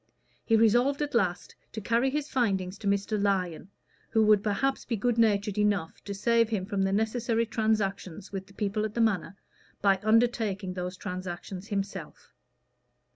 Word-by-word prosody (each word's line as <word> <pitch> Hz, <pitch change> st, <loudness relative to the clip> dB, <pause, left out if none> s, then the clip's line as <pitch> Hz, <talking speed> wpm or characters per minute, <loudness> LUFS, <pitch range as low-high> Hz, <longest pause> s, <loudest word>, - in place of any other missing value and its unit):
He 225 Hz, -, +3 dB
resolved 245 Hz, +6 st, +3 dB
at 290 Hz, -, -4 dB
last 190 Hz, -6 st, 0 dB, 0.2 s
to 220 Hz, -, -4 dB
carry 230 Hz, +5 st, +1 dB
his 295 Hz, +1 st, -2 dB
findings 195 Hz, -8 st, -1 dB
to 205 Hz, -, -4 dB
Mr. 200 Hz, +1 st, 0 dB
Lyon, 190 Hz, -3 st, -1 dB, 0.4 s
who 220 Hz, -2 st, +3 dB
would 210 Hz, -1 st, +5 dB
perhaps 245 Hz, +7 st, 0 dB
be 235 Hz, -, -2 dB
good 235 Hz, +2 st, 0 dB
natured 210 Hz, -2 st, +2 dB
enough 205 Hz, -6 st, 0 dB
to 200 Hz, -, -5 dB
save 230 Hz, +2 st, +2 dB
him 205 Hz, -5 st, -1 dB
from 200 Hz, -1 st, -2 dB
the 195 Hz, 0 st, +1 dB
necessary 225 Hz, +2 st, 0 dB
transactions 210 Hz, -4 st, -2 dB
with 195 Hz, -1 st, -5 dB
the 200 Hz, -, -17 dB
people 210 Hz, +1 st, -1 dB
at 215 Hz, 0 st, -4 dB
the 235 Hz, -, +1 dB
Manor 200 Hz, -3 st, 0 dB, 0.4 s
by 195 Hz, -1 st, +3 dB
undertaking 215 Hz, -4 st, +1 dB
those 180 Hz, 0 st, -5 dB
transactions 185 Hz, 0 st, -6 dB
himself. 200 Hz, -2 st, -5 dB
210 Hz, 165 wpm, -28 LUFS, 195-230 Hz, 0.4 s, would